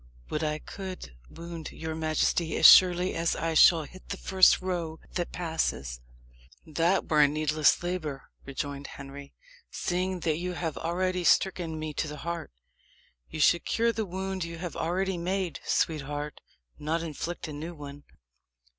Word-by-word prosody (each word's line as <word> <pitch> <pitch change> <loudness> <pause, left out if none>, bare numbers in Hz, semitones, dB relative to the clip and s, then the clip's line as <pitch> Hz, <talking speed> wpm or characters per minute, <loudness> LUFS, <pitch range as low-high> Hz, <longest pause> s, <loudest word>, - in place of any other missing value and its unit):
"Would 155 - -1
I 150 0 0
could 185 - -8
wound 170 -1 -8
your 160 0 -5
majesty 160 +1 0
as - - +3
surely 180 0 +8
as 165 0 0
I 165 0 -1
shall 160 +1 +7
hit 185 +6 -14
the - - -3
first 190 -1 +5
roe 170 -4 -3
that 175 -1 -2
passes." 70 - -2 0.6
"That 165 +5 +1
were 150 -1 +4
a 145 - +7
needless 155 +1 +2
labour," 160 -6 -3 0.2
rejoined 140 +1 -5
Henry, 140 0 -10 0.3
"seeing 185 0 -2
that 155 -2 0
you 180 +1 -3
have 165 -3 -3
already 180 +2 -1
stricken 175 -3 +2
me 155 -1 -4
to 155 - -2
the 150 0 -7
heart. 170 -2 -4 0.8
You - - -6
should 170 +3 +4
cure 230 0 +1
the 220 -2 -3
wound 190 0 -3
you 170 0 -6
have 175 0 -6
already 185 +2 -1
made, 185 0 -2
sweetheart 145 -1 -1 0.4
not 160 +3 -1
inflict 165 +2 -5
a 155 - -6
new 160 +4 -6
one." 145 -1 -9
165 Hz, 155 wpm, -28 LUFS, 150-180 Hz, 0.8 s, surely